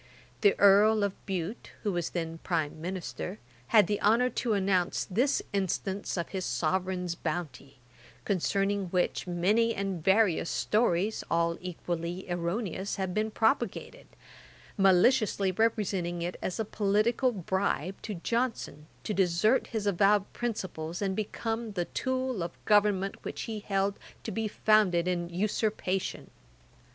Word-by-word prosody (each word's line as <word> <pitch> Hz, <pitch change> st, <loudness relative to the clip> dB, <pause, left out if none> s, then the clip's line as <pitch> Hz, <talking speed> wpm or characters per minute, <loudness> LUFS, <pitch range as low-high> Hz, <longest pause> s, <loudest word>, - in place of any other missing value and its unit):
The 205 Hz, -2 st, +4 dB
Earl 205 Hz, +2 st, +6 dB
of 200 Hz, -1 st, 0 dB
Bute, 190 Hz, +2 st, -4 dB
who 210 Hz, -, 0 dB
was 175 Hz, -3 st, -2 dB
then 165 Hz, -1 st, -4 dB
Prime 160 Hz, -3 st, -2 dB
Minister, 185 Hz, +2 st, -5 dB, 0.3 s
had 215 Hz, -4 st, +6 dB
the 205 Hz, +2 st, -2 dB
honour 240 Hz, +4 st, +3 dB
to 235 Hz, -3 st, -1 dB
announce 190 Hz, -3 st, +1 dB
this 245 Hz, +9 st, +1 dB
instance 195 Hz, 0 st, -2 dB
of 170 Hz, -, -2 dB
his 190 Hz, -2 st, -3 dB
Sovereign's 180 Hz, +1 st, -1 dB
bounty, 140 Hz, -6 st, -5 dB, 0.5 s
concerning 195 Hz, +1 st, 0 dB
which, 180 Hz, +1 st, -1 dB
many 210 Hz, +7 st, +2 dB
and 195 Hz, -4 st, -3 dB
various 190 Hz, -3 st, +3 dB
stories, 210 Hz, -2 st, +1 dB
all 170 Hz, 0 st, +1 dB
equally 175 Hz, 0 st, -4 dB
erroneous, 180 Hz, +3 st, -2 dB
have 190 Hz, -2 st, -2 dB
been 215 Hz, +2 st, 0 dB
propagated: 225 Hz, -, -1 dB, 0.7 s
maliciously 195 Hz, +1 st, +4 dB
representing 185 Hz, -5 st, 0 dB
it 175 Hz, +1 st, -3 dB
as 185 Hz, -, -3 dB
a 220 Hz, -, 0 dB
political 215 Hz, +5 st, +1 dB
bribe 190 Hz, -, -2 dB
to 210 Hz, -, -5 dB
Johnson, 230 Hz, -, -2 dB, 0.2 s
to 215 Hz, -, -2 dB
desert 190 Hz, +5 st, +2 dB
his 220 Hz, -3 st, -3 dB
avowed 200 Hz, +1 st, +3 dB
principles, 185 Hz, -7 st, -4 dB
and 190 Hz, -1 st, 0 dB
become 225 Hz, +1 st, -3 dB
the 175 Hz, -3 st, -1 dB
tool 260 Hz, -3 st, -2 dB
of 170 Hz, -, -2 dB
a -, -, -31 dB
government 205 Hz, -2 st, +2 dB
which -, -, -5 dB
he 220 Hz, -2 st, -4 dB
held 195 Hz, -1 st, -1 dB, 0.2 s
to 220 Hz, -, -4 dB
be 220 Hz, +1 st, -1 dB
founded 205 Hz, -5 st, +3 dB
in 175 Hz, -1 st, -1 dB
usurpation. 195 Hz, 0 st, -2 dB
195 Hz, 135 wpm, -29 LUFS, 175-215 Hz, 0.7 s, Earl